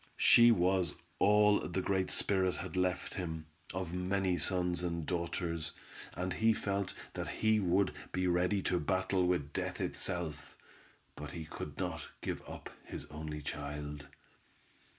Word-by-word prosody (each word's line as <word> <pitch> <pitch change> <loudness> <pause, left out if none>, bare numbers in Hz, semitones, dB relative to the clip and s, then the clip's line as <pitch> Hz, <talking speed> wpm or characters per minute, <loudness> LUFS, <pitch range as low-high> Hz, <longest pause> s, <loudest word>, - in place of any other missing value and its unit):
She 120 0 +8
was 90 -4 +3 0.2
all 105 0 +5
the - - -2
Great 95 0 +1
Spirit 95 -2 +3
had 95 -1 -6
left 90 0 0
him, 80 -4 -4 0.3
of 90 -2 -4
many 95 0 +1
sons 90 0 +1
and 85 -2 -2
daughters, 85 -2 -2 0.4
and 90 +1 -2
he 110 0 +4
felt 100 -2 -2 0.2
that - - -4
he 110 0 +2
would 95 0 +2 0.2
be 90 0 0
ready 90 +2 +2
to 90 - +1
battle 95 +2 +1
with 75 -5 0
death - - -2
itself, 85 -3 -3 0.6
but 75 -1 -6
he 80 -2 -5
could 75 -1 -7
not - - -3
give - - -3
up - - -8
his - - -7
only 75 -1 -5
child. 75 0 -5
90 Hz, 145 wpm, -34 LUFS, 80-95 Hz, 0.6 s, She